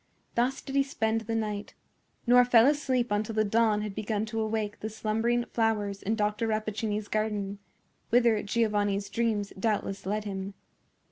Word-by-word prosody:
Thus 250 +3 0
did 270 - -7
he 275 - +5
spend 225 -5 0
the 225 +1 -3
night, 210 -2 -3 0.5
nor 245 0 +7
fell 245 -2 +6
asleep 260 -5 +1
until 210 +1 -1
the 215 - +3
dawn 215 0 +2
had 210 -2 -4
begun 215 0 -2
to 225 0 -3
awake 215 -1 -2
the 215 - -4
slumbering 225 +2 0
flowers 210 -4 -1
in 220 +3 0
Dr. 210 +1 0
Rappaccini's 215 -1 -2
garden, 205 -2 -2 0.5
whither 235 -3 +4
Giovanni's 205 -2 0
dreams 220 -4 -1
doubtless 200 -2 -1
led 210 +2 -1
him. 195 -1 -5
215 Hz, 155 wpm, -28 LUFS, 205-230 Hz, 0.5 s, nor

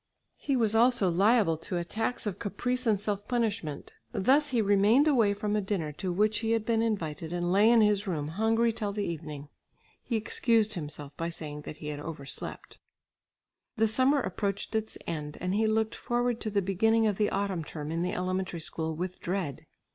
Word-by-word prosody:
He 275 - 0
was 225 -4 +2
also 230 -4 +4
liable 195 -2 +3
to 170 +3 -4
attacks 220 +8 -2
of 200 -2 -3
caprice 250 +4 -2
and 210 -3 +3
self 205 0 -3
punishment. 210 - -2 0.2
Thus 280 +9 +3
he 245 - +1
remained 210 +7 +4
away 230 -9 +3
from 210 +1 -1
a 210 - +2
dinner 190 -6 -2
to 180 +5 -4
which 210 +3 +2
he 225 0 0
had 225 -1 0
been 225 -1 +2
invited 165 -8 -2
and 175 0 -1
lay 205 +4 +5
in 235 -1 +6
his 210 -1 +2
room 150 -5 -2
hungry 225 +5 +2
till 215 -2 -2
the 205 0 -2
evening. 150 -3 -6 0.5
He 235 - -3
excused 220 0 +2
himself 150 -4 -6
by 165 0 -2
saying 150 -3 -6
that 150 - -7
he 150 - -6
had 145 -1 -4
overslept. 145 -3 -7 1.0
The 225 0 +4
summer 260 +6 +3
approached 200 -1 -3
its 220 0 -1
end 150 -2 -4
and 180 +1 -1
he 220 +2 +2
looked 220 0 +1
forward 240 -1 -1
to 220 - -2
the 200 -2 0
beginning 220 +4 +2
of 210 -3 +1
the 210 - +3
autumn 195 -4 -1
term 150 0 -6
in 165 +1 -1
the 180 +1 -1
elementary 185 -1 -2
school 160 0 -3
with 180 +3 -4
dread. 175 -6 -3
205 Hz, 195 wpm, -29 LUFS, 170-225 Hz, 1.0 s, in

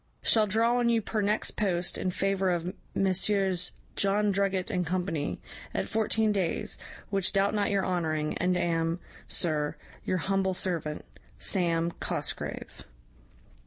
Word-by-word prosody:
Shall 220 -2 +4
draw 230 +4 +3
on 240 -1 +3
you 230 -1 +4
per 215 0 -2
next 210 +1 +2
post, 180 -4 -1
in 185 - -1
favour 195 +1 +1
of 175 +1 -1 0.2
Messieurs 190 -1 +1 0.2
John 205 +1 +2
Drugget 195 -1 0
and 180 - +1
company, 175 -3 -1 0.4
at - - 0
fourteen 220 0 +2
days, 190 -5 -1 0.3
which 195 -2 +2
doubt 195 0 +3
not 205 -1 +1
your 200 -1 +1
honouring, 155 -4 0
and 180 0 +2
am, 165 -1 0 0.3
Sir, 150 -3 0 0.3
your 185 - 0
humble 190 +1 +1
servant, 165 -5 -1 0.3
'SAM. 170 -3 +1
COSGRAVE.' - - -4
190 Hz, 135 wpm, -29 LUFS, 175-200 Hz, 0.4 s, Shall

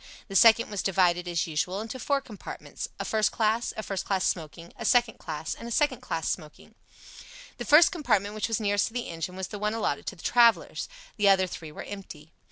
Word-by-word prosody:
The 195 - -6
second 230 +2 +6
was 205 - -2
divided, 180 -2 +2
as 170 -1 0
usual, 170 +4 -2
into 225 +4 -6
four 280 +1 0
compartments, 215 -6 -8
a - - -3
first 215 -1 +1
class, 225 +1 +1
a 220 - -3
first 195 -3 -3
class 190 -2 0
smoking, 165 0 -4
a - - -7
second 240 -2 +2
class, 155 +1 -4
and 230 - -9
a - - -6
second 295 +5 +1
class - - -3
smoking. - - -5 0.9
The - - -4
first 315 +5 +7
compartment, 210 - 0
which 215 - -2
was 225 -1 -1
nearest 205 -1 +1
to 225 - -10
the 245 -1 -3
engine, 165 +2 -5
was 190 0 -5
the 210 - -7
one 210 +1 -1
allotted 225 - -2
to - - -4
the 165 - -15
travellers. 235 - +3 0.3
The 205 -2 +4
other 190 -1 +5
three 160 -3 -8
were - - -8
empty. 165 -6 -9
205 Hz, 215 wpm, -27 LUFS, 180-230 Hz, 0.9 s, first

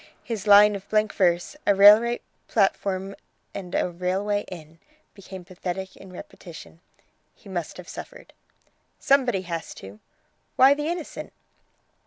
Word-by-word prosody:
His 220 -3 -5
line 205 0 +7
of 200 0 -10
blank 215 0 +1
verse, 175 +5 0
'A 200 - +4
Railway 210 +4 +6 0.3
platform 195 -2 -1 0.4
and 180 -3 -7
a - - +1
Railway 190 +4 -2
inn!' 165 -3 -12 0.3
became 190 -2 -11
pathetic 185 +1 -6
in 190 - -14
repetition. 170 -2 -12 0.5
He - - -19
must - - -5
have - - -11
suffered." - - -11 0.6
"Somebody 255 -8 +1
has 170 -2 -6
to!" 100 +2 -12 0.6
"Why 265 +2 +6
the 295 +1 -4
innocent?" 340 -1 -6
195 Hz, 130 wpm, -24 LUFS, 180-210 Hz, 0.6 s, line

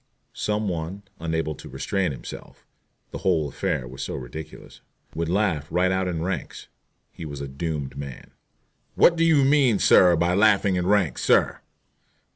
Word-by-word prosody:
Some 105 0 -2
one, 90 +3 -4 0.2
unable 80 -1 -2
to - - -12
restrain 95 -4 -1
himself 65 - -10 0.5
the - - -6
whole 85 -6 +1
affair 60 -1 -2
was 65 +1 -9
so - - -4
ridiculous 70 +4 -9 0.3
would 80 0 -3
laugh 90 -6 0
right 90 +2 +1
out 95 0 0
in 85 -3 -2
ranks. 95 +2 -5 0.4
He - - -10
was 70 -3 -7
a 70 - -5
doomed 70 0 -4
man. 70 -2 -8 0.6
"What 170 - +5
do 165 - +1
you 160 -4 +4
mean, 135 -5 +4
sir, 90 -2 +5
by 85 +2 +1
laughing 100 -1 +3
in 90 0 -1
ranks, 95 -10 +1
sir?" - - +2
85 Hz, 160 wpm, -24 LUFS, 75-100 Hz, 0.6 s, What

